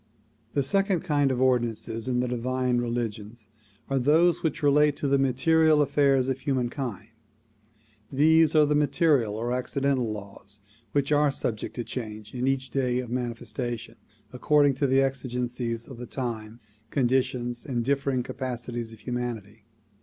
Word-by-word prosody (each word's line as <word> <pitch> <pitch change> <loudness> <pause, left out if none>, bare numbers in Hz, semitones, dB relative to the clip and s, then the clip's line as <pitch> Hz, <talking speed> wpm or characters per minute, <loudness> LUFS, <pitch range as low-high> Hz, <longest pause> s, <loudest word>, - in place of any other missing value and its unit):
The 140 - +1
second 195 +4 +1
kind 145 -6 +1
of 125 - -1
ordinances 120 -3 0
in 125 -1 +1
the 125 - -1
divine 125 +1 0
religions 115 -2 -4 0.4
are 135 -1 0
those 160 +7 +3
which 155 -2 -2
relate 145 0 +4
to 145 - -2
the 140 0 +3
material 150 +4 +3
affairs 140 -2 +3
of 135 0 -1
humankind. 125 -5 -3 1.0
These 160 +3 +4
are 155 -1 +6
the 150 - +1
material 140 -6 +2
or 120 +3 -2
accidental 130 -1 0
laws 100 0 -8 0.3
which 140 0 0
are 145 -1 +4
subject 110 -5 -3
to 120 - -3
change 110 -3 -7
in 125 0 -1
each 135 -1 -1
day 125 -2 0
of 125 -2 -4
manifestation, 120 -1 -4 0.4
according 145 +2 +3
to 140 - +1
exigencies 125 -3 -1
of 130 -4 -10
the 125 - -7
time, 115 -3 -5 0.3
conditions 125 -2 0
and 120 -4 -2
differing 135 -2 0
capacities 120 -2 -5
of 110 - -14
humanity. 115 -4 -5
125 Hz, 145 wpm, -26 LUFS, 120-140 Hz, 1.0 s, are